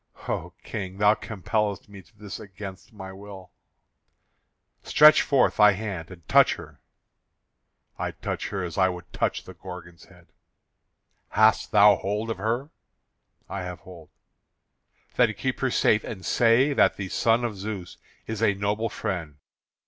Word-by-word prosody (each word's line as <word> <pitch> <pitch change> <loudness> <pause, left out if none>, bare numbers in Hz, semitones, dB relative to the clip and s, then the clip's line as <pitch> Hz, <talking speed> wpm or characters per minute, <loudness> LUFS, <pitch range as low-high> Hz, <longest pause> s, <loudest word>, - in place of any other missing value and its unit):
"O - - -3
King, 95 -3 -6
thou 105 +1 +5
compellest 105 -1 -3
me 100 -1 -12
to 105 +3 -27
this 105 -1 -8
against 100 -1 -10
my 95 -3 -9
will." 95 -1 -11 1.3
"Stretch 150 0 +6
forth 135 -4 +2
thy 105 -1 +7
hand 95 -5 -5
and 85 -5 -14
touch - - +5
her." - - -13 1.2
"I - - -2
touch - - -5
her 95 -2 -3
as 85 +1 -4
I 95 0 +4
would 90 -1 -8
touch - - -1
the - - -11
Gorgon's 85 -3 -11
head." - - -21 1.0
"Hast 110 +1 +3
thou 105 0 +6
hold 105 +3 -3
of 110 - -5
her?" 120 +8 -2 0.8
"I 100 - -5
have 90 -2 -7
hold." 85 -4 -13 1.1
"Then - - +3
keep - - -3
her - - +1
safe, 105 - +2
and 95 -4 -7
say 120 +5 +3
that - - +3
the 100 - -4
son 115 +4 +2
of 110 -3 -3
Zeus 100 -2 -6 0.3
is 110 -1 -5
a 105 -3 +3
noble 105 +3 -1
friend. 85 -8 -4
100 Hz, 150 wpm, -25 LUFS, 95-110 Hz, 1.3 s, thy